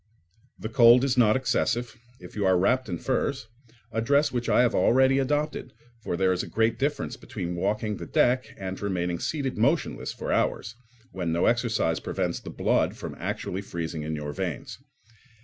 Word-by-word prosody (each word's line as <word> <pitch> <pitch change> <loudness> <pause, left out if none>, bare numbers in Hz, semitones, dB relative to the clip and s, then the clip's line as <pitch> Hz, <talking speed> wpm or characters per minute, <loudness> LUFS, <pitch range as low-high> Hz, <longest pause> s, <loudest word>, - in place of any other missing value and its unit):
The - - -5
cold 120 +1 +6
is 135 -2 +1
not 110 -4 +4
excessive, 120 -2 0 0.2
if - - -12
you 105 - -1
are 95 -1 +4
wrapped 125 +6 +1
in 85 - -2
furs—a 115 -2 -4
dress 140 +5 +3
which 120 -1 -2
I - - +5
have 125 - +2
already 130 +2 +4
adopted, 145 -1 -1 0.3
for 90 - -3
there 95 0 +3
is 90 - -1
a - - -6
great 115 0 0
difference 145 +2 -1
between 90 -4 -5
walking 105 +3 -1
the - - -7
deck 130 +1 +2
and 95 -1 -6
remaining 90 -4 -1
seated 135 -7 -2
motionless 140 +9 0
for - - -5
hours, 105 - 0 0.4
when 90 -3 -3
no 85 +1 +1
exercise 115 -9 +1
prevents - - -2
the - - -9
blood - - +1
from - - -7
actually 95 - -3
freezing 85 -4 -5
in 80 +1 -3
your 75 -1 -5
veins. 90 -3 -5
115 Hz, 175 wpm, -26 LUFS, 95-130 Hz, 0.4 s, cold